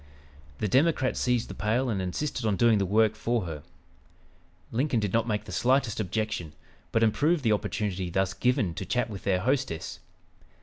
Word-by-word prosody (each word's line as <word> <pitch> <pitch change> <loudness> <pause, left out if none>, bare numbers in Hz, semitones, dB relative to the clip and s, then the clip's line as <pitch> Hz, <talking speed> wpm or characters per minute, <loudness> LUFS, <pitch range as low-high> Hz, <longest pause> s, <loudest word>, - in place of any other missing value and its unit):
The 105 - -1
Democrat 135 - +2
seized 125 -2 +1
the - - -7
pail 115 +5 0
and 105 -5 -1
insisted 125 +8 -3
on 105 -3 +1
doing 110 +1 +4
the 100 - 0
work 110 +2 +3
for 115 +2 -1
her. 80 -3 -6 1.1
Lincoln 125 +1 +1
did 105 -3 -2
not 115 +1 +2
make 105 -2 -1
the 110 - -9
slightest 130 -3 +1
objection, 105 -5 -2 0.4
but 115 - +2
improved 150 +8 +2
the 115 - +3
opportunity 100 -3 -1
thus 95 +2 0
given 110 -8 +1
to 95 - -5
chat 125 -2 0
with 100 - -8
their 95 -2 +2
hostess. 130 - -1
110 Hz, 175 wpm, -28 LUFS, 95-125 Hz, 1.1 s, doing